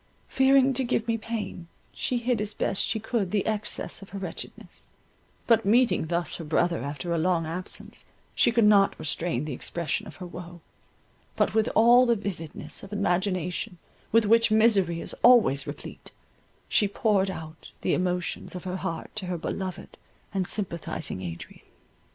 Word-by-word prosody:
Fearing 270 0 +4
to 260 +1 +1
give 235 -2 0
me 230 - +2
pain, 220 -6 -5 0.3
she 250 - -1
hid 240 -2 0
as 210 0 -3
best 195 - 0
she 220 - -1
could 220 -3 -1
the 205 +1 0
excess 215 -1 -2
of 195 - -11
her 200 - -7
wretchedness, 185 -4 -8 0.6
but 230 -3 +4
meeting 210 -5 +3
thus 170 +1 -1
her 170 - -6
brother 170 +2 +1
after 145 +5 -3
a 165 - +1
long 170 -1 +1
absence, 175 +3 -4 0.3
she - - +3
could 235 -1 +3
not 200 -2 +5
restrain 155 -2 -1
the 150 - -4
expression 170 +10 -3
of - - -10
her 185 - -8
woe, 175 -1 -9 0.7
but - - +1
with 220 +1 +2
all 240 +3 +7
the 235 - +4
vividness 165 -7 -5
of 200 - -11
imagination 180 -3 -1 0.3
with 230 0 +4
which 230 +2 +5
misery 205 -6 +3
is - - -3
always 175 - +5
replete, - - -8 0.6
she 205 - +3
poured 200 -1 +1
out 160 -3 -8
the - - +1
emotions 180 0 -2
of 180 - -6
her 185 0 -3
heart 165 -2 -4
to 200 -4 -4
her 180 -1 -2
beloved 185 +2 -5 0.3
and 190 -2 -1
sympathizing 170 - -2
Adrian. 85 -2 -8
190 Hz, 165 wpm, -27 LUFS, 170-220 Hz, 0.7 s, all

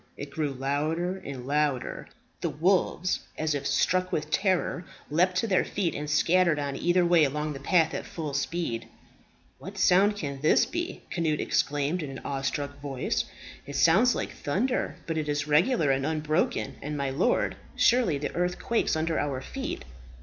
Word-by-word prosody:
It 140 0 -7
grew 150 0 -1
louder 155 +7 -1
and 130 -3 -7
louder. 145 -2 -1 0.3
The - - 0
wolves, 185 +2 +1 0.2
as 155 -1 0
if 140 -1 -2
struck 185 +5 +1
with 155 0 -2
terror, 185 -2 +1 0.3
leaped 180 +4 +3
to 185 - +1
their 190 -3 +3
feet, 185 -5 -1
and 150 +1 -4
scattered 170 +1 +3
on 140 -1 -2
either 175 +4 +2
way 170 -2 +5
along 150 +2 -1
the 135 - -7
path 160 +3 +2
at - - -4
full 155 -4 -5
speed. 145 -5 -2 0.7
"What 195 +3 -9
sound 195 +2 +4
can 140 -8 -5
this 155 - +4
be?" 345 +2 -4
Cnut 160 -4 0
exclaimed 145 +4 0
in 150 - -5
an 135 - -7
awestruck 140 +1 -3
voice. 135 -3 -1 0.4
"It 140 - -6
sounds 205 - +5
like - - -3
thunder; 225 - -1
but 165 -1 -1
it 150 -1 -3
is 145 0 -1
regular 155 - +3
and 135 0 +1
unbroken; 155 -3 0
and, 150 +1 -4
my 140 -1 -1
lord, 180 - +1 0.2
surely 235 - +3
the 145 +1 -4
earth 180 +1 0
quakes 235 -7 0
under 160 0 0
our 140 -3 -1
feet!" 130 - -5
155 Hz, 170 wpm, -27 LUFS, 145-180 Hz, 0.7 s, way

